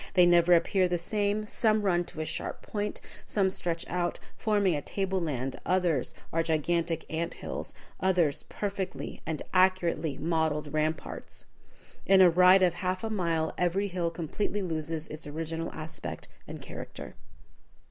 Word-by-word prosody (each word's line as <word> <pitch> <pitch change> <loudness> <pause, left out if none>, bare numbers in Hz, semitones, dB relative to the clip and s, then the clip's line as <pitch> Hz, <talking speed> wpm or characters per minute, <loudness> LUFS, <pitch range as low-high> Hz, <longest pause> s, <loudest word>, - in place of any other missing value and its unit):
They 180 -1 +7
never 175 0 +6
appear 185 +2 +3
the 175 0 0
same; 205 +4 -1
some 215 0 +1
run 175 -3 +2
to 155 - -7
a - - -2
sharp - - -4
point, 205 -1 -3 0.2
some 195 -2 +1
stretch 170 -3 -1
out, 175 0 -1 0.2
forming 205 -5 +2
a 145 - -2
table 190 +3 -2
land, 135 -5 -2
others 175 -7 +1 0.2
are 165 - +3
gigantic 165 +1 0
ant 165 +1 -3
hills, - - -6 0.2
others 175 -6 +2
perfect 195 -6 -3 0.3
and 160 -2 -2
accurately 185 -5 +2
modelled 155 -2 0
ramparts. 155 +1 -3 0.6
In 195 0 +7
a 180 -2 +8
ride 185 +2 +7
of 180 -2 +4
half 185 +2 -2
a 220 - -2
mile, 165 -6 0
every 190 +3 +1
hill 175 -2 -1
completely 180 +5 -2
loses 160 -2 -2
its 155 0 -6
original 165 +2 -4
aspect 85 - -6 0.2
and - - -8
character. - - -8
175 Hz, 150 wpm, -29 LUFS, 160-190 Hz, 0.6 s, a